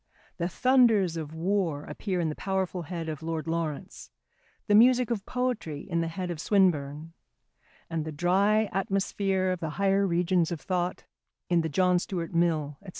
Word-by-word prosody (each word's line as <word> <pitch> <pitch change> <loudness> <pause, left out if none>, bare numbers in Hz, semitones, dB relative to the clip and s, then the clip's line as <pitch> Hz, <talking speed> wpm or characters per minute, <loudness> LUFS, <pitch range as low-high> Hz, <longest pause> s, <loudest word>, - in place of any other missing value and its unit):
The 170 - -1
thunders 230 -6 +3
of 155 -2 -5
war 170 -4 0
appear 190 -4 -3
in 165 -2 0
the 150 - -4
powerful 190 -2 -2
head 165 0 -5
of 155 -2 -5
Lord 160 -2 -3
Lawrence, 160 - -4 0.6
the 205 - +1
music 245 +2 +5
of 210 -4 -3
poetry 245 - -2
in 170 -3 -2
the 165 - -1
head 175 +2 -4
of 160 -3 -5
Swinburne, 160 -5 +1 0.7
and 165 -2 -2
the 160 - -5
dry 195 +7 +2
atmosphere 195 -1 0
of 185 - -2
the 160 - -3
higher 195 0 +2
regions 175 0 +1
of 170 - -3
thought 180 0 -2 0.5
in 175 -1 +3
the 160 - -2
John 180 +3 +3
Stuart 175 -2 -4
Mill, 155 -4 0
&c. 195 - -10
175 Hz, 170 wpm, -28 LUFS, 160-195 Hz, 0.7 s, music